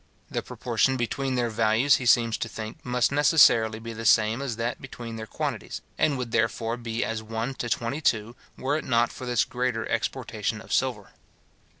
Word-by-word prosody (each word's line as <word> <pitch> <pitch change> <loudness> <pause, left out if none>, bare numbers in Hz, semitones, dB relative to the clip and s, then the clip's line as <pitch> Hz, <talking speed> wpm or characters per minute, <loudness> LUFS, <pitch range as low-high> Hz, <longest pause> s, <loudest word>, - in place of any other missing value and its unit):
The - - -1
proportion 125 +2 0
between 130 +2 -1
their 120 -2 0
values, 115 +5 +3
he 125 - -3
seems 115 -1 +4
to 115 - -3
think, 110 0 -7
must 125 0 +1
necessarily 135 -7 +5
be 115 +1 -7
the 115 +1 -7
same 110 +2 +4
as 130 -5 -3
that 115 +2 -3
between 120 -3 -8
their 110 -1 -6
quantities, - - -4
and 145 -3 +2
would 125 -2 -4
therefore 115 +1 0
be 115 -1 -3
as 115 -1 -3
one 115 +4 -3
to 120 - -3
twenty 120 +7 -1
two, 115 -4 0 0.2
were 140 +3 0
it 155 - -2
not 120 -1 +2
for 125 - -8
this 120 -3 +2
greater 125 -2 -2
exportation - - -2
of - - -7
silver. - - 0
115 Hz, 190 wpm, -26 LUFS, 115-125 Hz, 0.2 s, necessarily